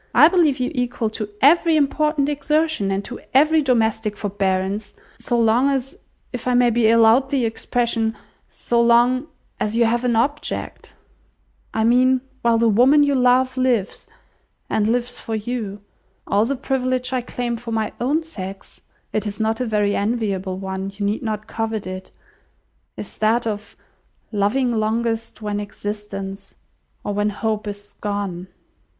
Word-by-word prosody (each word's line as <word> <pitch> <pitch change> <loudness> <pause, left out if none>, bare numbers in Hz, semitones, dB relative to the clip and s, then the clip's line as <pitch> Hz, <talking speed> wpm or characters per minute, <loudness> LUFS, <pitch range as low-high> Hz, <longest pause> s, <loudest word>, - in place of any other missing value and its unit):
I 300 +6 +8
believe 325 -7 +3
you 250 - -1
equal 245 -3 -1
to 215 -1 -5
every 330 +3 +5
important 300 0 +1
exertion, 295 -5 0
and 195 +1 -2
to 245 - -7 0.2
every 310 +3 +5
domestic 220 -5 +1
forbearance, 200 0 -2 0.2
so 240 - 0
long 230 +4 +3
as—if 270 - -6
I 250 - +2
may 245 -1 +4
be 225 -1 +3
allowed 230 +4 +5
the 265 -4 +1
expression—so 230 0 -2
long 240 +4 +4 0.3
as 215 +1 -1
you 235 0 +4
have 235 +2 +1
an 245 -2 +1
object. 290 +6 -2 0.8
I 220 - 0
mean 255 +2 +4 0.2
while 235 -1 +3
the 230 0 +3
woman 255 +7 +5
you 285 0 +2
love 255 0 +3
lives, 245 -6 0 0.6
and 210 -1 +2
lives 245 +1 -1
for 225 - -4
you. 215 -2 -4 0.4
All 205 +3 +2
the 275 - -1
privilege 255 -1 -1
I 255 - +1
claim 245 0 -3
for 230 0 -7
my 220 -1 -1
own 295 +6 +1
sex 195 -11 -8 0.3
(it 215 0 -1
is 205 +1 -5
not 220 0 0
a 250 - -1
very 210 -2 +1
enviable 200 -4 -1
one; 190 0 -4
you 200 0 -3
need 205 +2 -1
not 215 -3 -3
covet 225 -2 -3
it), 185 0 -7 0.9
is - - -8
that 225 +2 +2
of 210 -1 -5 0.5
loving 235 +5 +1
longest, 225 0 -1
when 205 -1 -2
existence 200 -1 -6 0.5
or 205 - -2
when 205 +1 +1
hope 215 0 -2
is 205 0 -8
gone." 200 -3 -3
230 Hz, 150 wpm, -21 LUFS, 210-255 Hz, 0.9 s, I